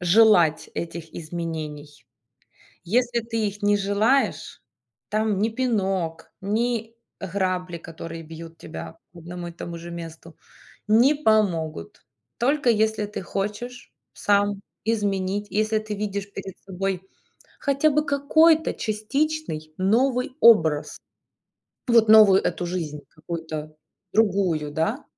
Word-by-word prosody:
желать 175 -3 +4
этих 165 -1 -6
изменений. 155 -5 -6 0.8
Если 240 +5 +1
ты 225 -1 -2
их 205 +1 -6
не 205 0 +4
желаешь, 210 +7 +1 0.5
там 215 -2 0
ни 215 +3 +2
пинок, 195 -9 -2
ни 225 +2 -1 0.3
грабли, 185 -2 -2
которые 165 0 -8
бьют 165 +1 -10
тебя 160 +1 -9
по 175 - -13
одному 175 +1 -7
и - - -9
тому 170 0 -7
же 170 +1 -9
месту, 165 -1 -9 0.5
не 240 +7 +5
помогут. 180 - 0 0.3
Только 275 +2 +1
если 220 -1 +1
ты 210 - -6
хочешь 210 +6 -5 0.2
сам 205 -1 +1 0.2
изменить, 205 -2 -1
если 215 +1 +1
ты 215 -1 -5
видишь 200 -1 -4
перед 190 -1 -8
собой 190 -1 -3 0.6
хотя 280 +2 +2
бы 300 +1 +1
какой-то 315 +3 +4
частичный 215 - -2
новый 250 +7 +2
образ, 160 -10 +5 0.9
вот 230 -2 +5
новую 215 -3 +8
эту 175 - -2
жизнь, 165 -4 -4
какую-то 155 -1 -6 0.4
другую, 190 -8 +1
да. 210 - -1
200 Hz, 115 wpm, -24 LUFS, 170-225 Hz, 0.9 s, новую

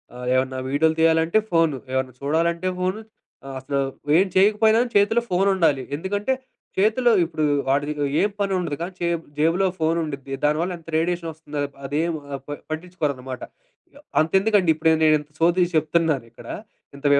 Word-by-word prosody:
ఆహ్, 125 0 -7
ఏమన్నా 130 0 0
వీడియోలు 160 +3 +2
తీయాలంటే 165 +4 +4
ఫోను, 165 -4 +3 0.2
ఏమన్నా 130 -1 -1
చూడాలంటే 170 +5 0
ఫోను, 185 +4 -1 0.4
ఆహ్, 135 -1 -7
అసలు 140 +1 -2 0.4
ఏం 190 - +5
చేయకపోయినా 215 +3 +4 0.2
చేతిలో 220 +4 +3
ఫోనుండాలి. 180 -8 +2
ఎందుకంటే, 205 - -1 0.4
చేతిలో 220 +5 +3
ఇప్పుడు 160 -2 -3 0.2
వాాడిది 145 +2 +1
ఇగో 145 -1 -2
ఏం 205 - +3
పని 200 -1 0
ఉండదు. 170 -5 -2
కానీ, 185 +2 -5
చే 175 - 0 0.3
జేబులో 165 +5 +3
ఫోను 160 +1 +1
ఉండిద్ది. 140 -2 -6
దానివల్ల 155 +5 +1
ఎంత 165 - -24
రేడియేషన్ 170 0 -1
ఒస్తుందో 150 -1 -7 0.3
అదేం 160 +5 0 0.2
ఆహ్, 135 - -3
ప - - -13 0.2
పట్టించుకోరన్నమాట. 150 -6 -4 0.5
య - - -14 0.2
అంతెందుకండి, 190 +3 +2
ఇప్పుడు 160 +1 +3
నేనింత 155 -1 +3
సోది 175 +2 +4
చెప్తున్నాను 155 -4 +1
ఇక్కడ. 115 - -14 0.5
ఇంత 140 +1 -12
165 Hz, 150 wpm, -23 LUFS, 145-185 Hz, 0.5 s, ఏం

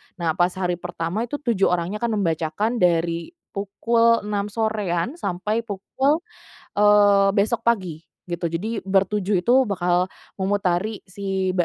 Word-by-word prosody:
nah 170 -3 0
pas 175 +2 +2
hari 180 -2 -1
pertama 180 +5 -3
itu 265 - -4
7 230 -7 +2
orangnya 180 +4 -1
akan 235 -1 0
membacakan 165 +8 -1
dari 170 - +1 0.2
pukul 230 +3 +2
6.00 205 -1 -2
sorean 215 - -1
sampai 210 - -1
pukul 265 - -1 0.5
eee, 205 -1 +5
besok 210 +3 +1
pagi 185 -9 0 0.2
gitu, 175 0 -4
jadi 190 +7 -2
bertujuh 195 0 +1
itu 235 +7 +1
bakal 180 -4 +1 0.3
memutari 195 +1 0
si 190 0 -2
tempat 175 - +3
200 Hz, 135 wpm, -23 LUFS, 175-215 Hz, 0.5 s, eee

